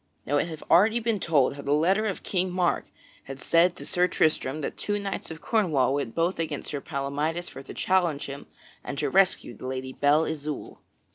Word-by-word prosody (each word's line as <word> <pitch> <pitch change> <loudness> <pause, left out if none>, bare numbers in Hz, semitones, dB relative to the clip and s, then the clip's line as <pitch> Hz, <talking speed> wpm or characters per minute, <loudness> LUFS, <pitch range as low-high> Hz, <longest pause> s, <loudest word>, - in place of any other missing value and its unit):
Now 145 - +1
it 155 - +1
hath 160 -2 -8
already 215 +7 +4
been 225 -2 0
told 145 -7 +2
how 140 - -8
the 140 +1 0
letter 190 +8 +2
of 195 - -4
King 185 -1 0
Mark 180 -1 +1 0.4
had 135 0 -8
said 170 +4 +3
to - - -9
Sir 180 0 +2
Tristram 155 -3 +1
that - - -4
two 205 0 -2
knights 200 -1 -4
of 160 0 -8
Cornwall 155 - +2
went 140 -5 -2
both 170 +2 0
against 155 -3 -3
Sir 145 -2 -4
Palamydes 150 +5 -2
for 135 - -9
to 135 - -10
challenge 175 -6 +1
him 140 0 -8 0.4
and 140 - -5
to 145 -1 -1
rescue 185 - +2
the 130 - -8
Lady 130 0 -4
Belle 145 +4 +3
Isoult. 150 -2 -5
160 Hz, 205 wpm, -26 LUFS, 140-180 Hz, 0.4 s, already